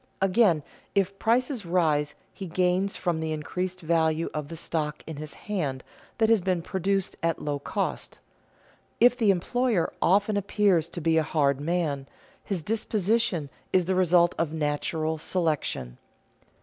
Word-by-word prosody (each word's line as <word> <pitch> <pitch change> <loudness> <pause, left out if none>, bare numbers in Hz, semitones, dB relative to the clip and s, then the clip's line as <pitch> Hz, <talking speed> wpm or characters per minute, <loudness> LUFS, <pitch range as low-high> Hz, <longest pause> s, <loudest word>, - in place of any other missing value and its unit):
Again, 190 -5 +3 0.3
if 195 0 +1
prices 245 +1 +1
rise, 155 -4 +1 0.2
he 190 - -7
gains 185 +3 +1
from 175 -3 -1
the 160 0 -2
increased 180 +4 -3
value 160 0 +1
of 150 -1 -3
the 165 - -7
stock 150 -2 -3
in 160 -2 -7
his 150 0 -6
hand 145 -11 -3 0.3
that 225 - +3
has 225 -3 +4
been 180 -2 0
produced 195 +1 -1
at 165 -1 0
low 145 -1 -2
cost. - - -3 0.8
If 245 +1 +6
the 225 -5 +2
employer 205 +1 +1
often 205 +3 +3
appears 195 -4 +2
to 175 - -6
be 160 +1 +2
a - - +3
hard 140 -3 +1
man, 150 -4 -1 0.4
his 185 -6 -3
disposition 210 -7 0 0.2
is 185 -2 +3
the 190 - 0
result 175 -1 +4
of 165 -3 0
"natural 155 +1 -1
selection." 150 - -2
175 Hz, 150 wpm, -27 LUFS, 155-195 Hz, 0.8 s, If